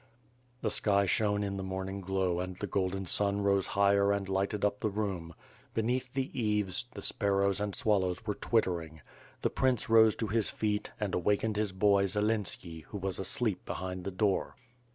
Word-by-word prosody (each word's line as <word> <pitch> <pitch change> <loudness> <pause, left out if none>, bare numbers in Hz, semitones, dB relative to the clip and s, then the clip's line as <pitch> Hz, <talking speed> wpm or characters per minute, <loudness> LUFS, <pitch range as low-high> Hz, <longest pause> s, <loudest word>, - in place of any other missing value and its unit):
'' 125 0 -36
The 110 - +1
sky 100 -1 +3
shone 105 +2 +2
in 100 -1 -3
the 95 - -4
morning 95 +1 -4
glow 95 -2 0
and 90 0 -4
the - - -4
golden 95 0 -1
sun 100 +2 +1
rose 100 -1 +2
higher 100 0 +3
and 100 -1 -1
lighted 100 +2 0
up 105 0 0
the 110 - 0
room. 95 -6 -3 0.4
Beneath 125 +3 0
the 135 0 -2
eaves, 105 -3 0
the - - -9
sparrows 100 -1 +1
and 105 -1 -2
swallow^s 100 -6 +1
were 105 - 0
twittering. 85 -9 -1 0.4
The - - +1
prince 130 -4 +1
rose 110 -1 +6
to 115 - -2
his 110 +1 +1
feet 105 -1 -1
and 105 -3 -2
awakened 105 +4 +1
his 105 -1 0
boy, 100 +1 +3
Zelenski, 105 -5 -1
who 105 - -7
was 95 -1 -2
asleep 100 +1 0
behind 90 0 -5
the 100 - -3
door. 100 +1 0
100 Hz, 180 wpm, -31 LUFS, 95-105 Hz, 0.4 s, rose